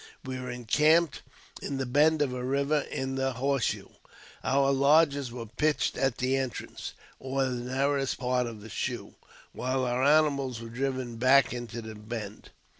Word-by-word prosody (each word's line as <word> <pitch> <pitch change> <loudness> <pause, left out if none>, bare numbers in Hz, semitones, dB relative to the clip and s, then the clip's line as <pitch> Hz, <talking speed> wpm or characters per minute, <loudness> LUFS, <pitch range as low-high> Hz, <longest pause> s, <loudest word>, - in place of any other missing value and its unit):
We 130 0 -4
were 125 0 -5
encamped 150 +6 +2 0.4
in 140 - -3
the 135 - -1
bend 150 +4 +4
of 130 -3 -2
a 125 -1 -4
river 140 +3 +1
— - - -15
in 130 0 -2
the 135 0 0
"horse 135 0 0
shoe." - - -3 0.5
Our 140 +1 +3
lodges 140 -1 +3
were 120 -1 -6
pitched 150 +7 0
at 135 -3 0
the 130 +1 +1
entrance, 130 -4 -5 0.3
or 135 0 -1
narrowest 130 +2 -1
part 125 -1 0
of 110 -3 -8
the 110 - -10
shoe, - - -4 0.4
while 130 +1 -1
om 125 +1 0
animals 140 -4 +3
were 115 0 -8
driven 130 -1 -3
back 130 +1 +5
into 120 -1 -6
the 110 0 -7
bend. 105 -1 -7
130 Hz, 170 wpm, -28 LUFS, 120-140 Hz, 0.5 s, back